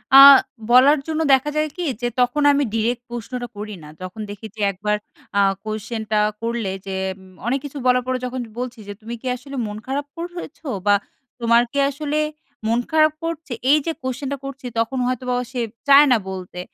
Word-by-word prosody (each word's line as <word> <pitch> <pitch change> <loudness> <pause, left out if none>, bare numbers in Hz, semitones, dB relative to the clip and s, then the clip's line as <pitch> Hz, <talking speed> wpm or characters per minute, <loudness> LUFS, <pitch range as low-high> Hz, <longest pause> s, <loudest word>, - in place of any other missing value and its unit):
আ - - +12 0.5
বলার 265 +5 +7
জন্য 320 0 -1
দেখা 265 +2 +3
যায় 305 0 +1
কি 355 - -2 0.2
যে 240 - +1
তখন 250 +4 +2
আমি 285 0 +2
ডিরেক্ট 230 +2 0
প্রশ্নটা 240 +1 -5
করি 210 0 -6
না। 150 - -11
যখন 185 +4 -7
দেখি 205 +2 -8
যে 215 - -7
একবার 210 +2 -1 0.4
আ - - +5 0.2
কোয়েশেন্টা 215 0 -2 0.2
করলে 230 -4 -2
যে 195 -1 -4 0.2
উম 190 0 -17
অনেক 270 +3 +1
কিছু 285 0 -7
বলার 250 0 +4
পরে 255 0 0
যখন 255 +1 -4 0.2
বলছি 250 -2 -5
যে, 205 - -5
"তুমি 225 +2 -7
কি 260 - -6
আসলে 275 +2 -9
মন 210 0 -6
খারাপ 280 +2 -2
কর 335 0 -4
হয়েছ? 335 -2 -8 0.3
বা, 205 - +7 0.4
তোমার 235 0 +4
কি 280 - -1
আসলে 295 +1 -2 0.5
মন 230 +2 +2
খারাপ 310 -1 +4
করছে?" 330 -3 -4 0.2
এইযে 305 +2 +3
কোয়েশেন্টা 265 +2 -3
করছি, 275 0 -8
তখন 230 +4 0
হয়তোবা 250 0 -1 0.2
সে 250 -2 -2 0.3
চায় 280 +1 +8
না 245 - +6
বলতে। 185 -1 -7
250 Hz, 185 wpm, -21 LUFS, 220-280 Hz, 0.5 s, আ